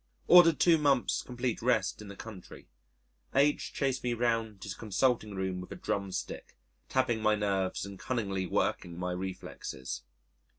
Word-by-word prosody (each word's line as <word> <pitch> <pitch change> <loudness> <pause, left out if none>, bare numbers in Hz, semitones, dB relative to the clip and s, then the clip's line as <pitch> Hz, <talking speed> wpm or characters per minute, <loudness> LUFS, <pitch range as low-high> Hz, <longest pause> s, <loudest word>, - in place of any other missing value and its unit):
Ordered 170 -3 +7
two 170 -2 +5
months' 140 -4 +2
complete 125 -1 -3
rest - - +1
in 105 - -9
the 100 - -9
country. 105 -4 -10 0.7
H 145 +2 +3
chased 135 -2 -1
me 120 -1 0
round 115 -4 -1
his 100 - -4
consulting 110 0 0
room 95 -1 -2
with 90 - -10
a - - -5
drum 100 -1 -2
stick, 95 - -6 0.3
tapping 130 -4 +1
my 110 0 +4
nerves 100 -3 -1
and 100 -1 -9
cunningly 100 -7 -2
working 85 -1 -1
my 90 0 -2
reflexes. 90 -8 -5
110 Hz, 155 wpm, -31 LUFS, 95-125 Hz, 0.7 s, Ordered